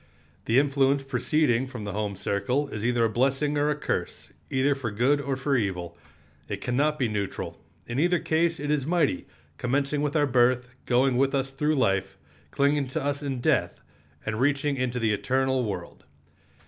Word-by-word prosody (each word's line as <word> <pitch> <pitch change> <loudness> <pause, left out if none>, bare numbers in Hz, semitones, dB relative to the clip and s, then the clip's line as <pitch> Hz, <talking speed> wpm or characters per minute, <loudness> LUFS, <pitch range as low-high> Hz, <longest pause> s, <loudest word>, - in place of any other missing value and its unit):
The 115 - +2
influence 140 0 +3
preceding 135 -1 +1
from 125 -5 -7
the 100 - -4
home 105 -1 -2
circle 125 +9 -1
is 110 -5 -5
either 120 -1 +2
a - - +4
blessing 135 +5 +1
or 145 +1 +2
a 150 - +1
curse, 150 - -3 0.2
either 135 +2 +2
for 135 -4 -4
good 125 +7 +2
or 140 -1 -2
for 140 +1 0
evil. 90 -7 -2 0.5
It 100 - -3
can 125 +3 -2
not 150 +3 +2
be 130 -5 +1
neutral. 105 -2 -4 0.2
In 120 +3 -3
either 175 +3 +3
case 165 +1 +1
it 145 +1 -2
is 145 -2 0
mighty, 160 - +1 0.3
commencing 140 +3 0
with 145 0 -1
our 150 -1 +4
birth, 125 -1 +2
going 125 +1 +3
with 135 +1 +2
us 135 0 -1
through 150 +3 0
life, 95 -6 0 0.3
clinging 140 - +1
to 130 - -3
us 140 0 -1
in 135 -4 -3
death, - - +1 0.5
and 110 0 -2
reaching 140 +1 +1
into 125 -2 -1
the 110 -3 +1
eternal 130 +4 +1
world. 100 -6 -5
130 Hz, 185 wpm, -26 LUFS, 120-145 Hz, 0.5 s, a